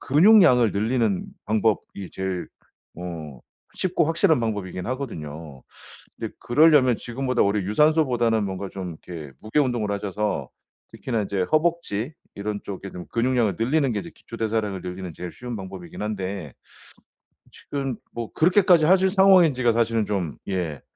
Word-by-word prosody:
근육량을 150 - +6
늘리는 110 -2 0 0.2
방법이 105 -3 -1
제일 95 -2 -3 0.5
어 80 -7 -7 0.3
쉽고 175 -3 +1
확실한 165 0 +3
방법이긴 100 -5 -3
하거든요. 80 - -6 0.6
근데 - - -5
그러려면 135 -3 +5
지금보다 125 +1 -2
오히려 100 0 +1
유산소보다는 120 -3 +2
뭔가 95 0 -4
좀 90 -4 -6
이렇게 80 -6 -7
무게 110 +7 0
운동을 120 -7 0
하셔서 100 +1 -2 0.4
특히나 115 -4 -2
이제 100 -1 -2
허벅지 155 -6 0 0.2
이런 105 +1 -3
쪽에 100 0 -7
좀 90 - -8
근육량을 120 -5 +1
늘리는 135 +3 +2
게 - - -1
이제 170 - -8
기초대사량을 110 -4 -3
늘리는 90 0 -6
제일 90 +2 -7
쉬운 125 -1 -7
방법이긴 95 -3 -8
한데 95 - -4 1.0
지금 135 -3 -4 0.2
뭐 115 -2 -6
그렇게까지 180 -1 +4
하실 190 +3 +5
상황인지가 180 - +5
사실은 115 -2 +1
좀 95 -8 -2
예 85 -7 -2
110 Hz, 345 characters per minute, -24 LUFS, 95-135 Hz, 1.0 s, 근육량을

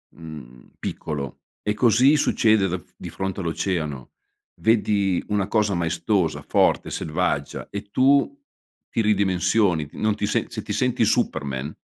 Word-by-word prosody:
mhmm, 75 -7 -11
piccolo 70 -3 -5 0.3
e 105 - 0
così 125 +6 +4
succede 110 -8 +3
da 90 +1 -2 0.2
di - - -8
fronte 95 0 -4
all'oceano. 80 -6 -3 0.5
Vedi 105 -4 +2
una 100 -2 0
cosa 105 -2 +1
maestosa, 85 +1 0
forte, - - +2
selvaggia 70 -2 -2
e 100 0 -6
tu 140 - +3 0.5
ti 115 - +1
ridimensioni, 95 -4 +2
t - - -25
non 110 0 +1
ti 105 0 -2
se 105 - 0
se - - -5
ti - - -7
senti - - +1
Superman, 70 +1 -1
95 Hz, 135 wpm, -23 LUFS, 80-105 Hz, 0.5 s, così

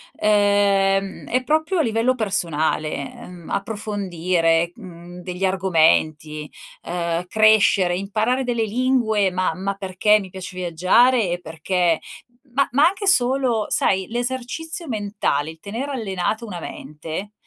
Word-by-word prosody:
Ehm, 200 -2 +2
è 255 +2 0
proprio 315 +6 +1
a - - +5
livello 230 +1 +1
personale, 160 - -1
ehm, 175 -2 -12
approfondire, 180 -5 0
mhmm, 175 -3 -12
degli 180 +1 -6
argomenti, 155 -5 +1 0.3
uhm, 170 0 -2
crescere, 205 -4 +4
imparare 220 +7 -1
delle 235 -2 0
lingue, 220 -3 +1
ma 185 -2 -1
ma 195 +3 -2
perché 195 +2 +2
mi 190 - -9
piace 185 0 -8
viaggiare 185 +5 +3
e 175 - -3
perché 170 +1 0 0.5
ma 275 +2 +3
ma 285 +6 +5
anche 395 +2 -2
solo, 250 - +3
sai, 190 -1 +1
l'esercizio 260 +8 -4
mentale, 205 - -1
il 160 0 -11
tenere 235 - -5
allenata 215 -2 -2
una 180 -6 -7
mente, 160 +9 -7
195 Hz, 125 wpm, -21 LUFS, 175-230 Hz, 0.5 s, a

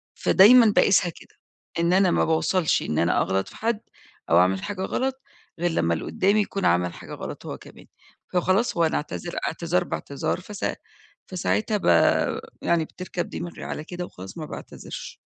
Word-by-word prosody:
فدايمًا 220 +2 +6
باقيسها 185 -3 +4
كده - - -15 0.4
إن 170 +2 +2
أنا 190 -1 +4
ما - - +2
باوصلش 160 +1 +2
إن 75 - -1
أنا 85 - +2
أغلط 95 0 0
في - - -13
حد 225 -1 -1 0.5
أو 85 - +5
أعمل 95 +1 +2
حاجة 195 -2 -4
غلط 265 +6 -2 0.4
غير 175 -1 +1
لما 85 - +1
اللي 80 - -3
قدامي 200 +3 +2
يكون 195 -2 -2
عمل 90 0 +2
حاجة - - -10
غلط - - -7
هو - - -5
كمان، - - -15 0.5
فخلاص 185 +5 +1
هو 170 - +4
أنا 160 - 0
أعتذر، 170 +3 -5
اعتذار 170 +2 0
باعتذار 140 +1 -3
ف 200 - -13 0.8
فـساعتها 210 +4 0
ب - - -7 0.8
يعني 165 -2 +1
بتركب 180 0 -5
دماغي 175 - -6
على 150 - -5
كده 180 +2 -6
وخلاص 95 - -11
ما 155 - -5
باعتذرش. - - -8
175 Hz, 170 wpm, -24 LUFS, 155-195 Hz, 0.8 s, فدايمًا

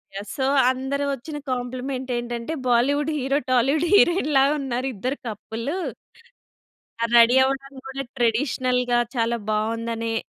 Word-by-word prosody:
Yeah! 200 - -5
So 265 -2 -1 0.3
అందరు 265 +2 -2
ఒచ్చిన 295 +4 -8
complement 255 +1 -4
ఏంటంటే, 240 +4 -4
బాలీవుడ్ 280 +5 +2
హీరో, 275 +1 0
టాలీవుడ్ 275 +7 +2
హీరోయిన్‌ 345 -6 +4
లాగా 275 +2 +4
ఉన్నారు 260 -1 -2
ఇద్దరు 255 +8 -3
కప్పులు. 230 - -4 1.3
ఆ - - +4
రెడీ 235 +2 +7
అవ్వడం 275 +1 -2
కూడా, 270 +1 -4 0.2
ట్రెడిషనల్‌గా 250 +1 +1 0.2
చాలా 230 0 +1
బావుందనే 230 +1 -1
255 Hz, 125 wpm, -23 LUFS, 235-275 Hz, 1.3 s, రెడీ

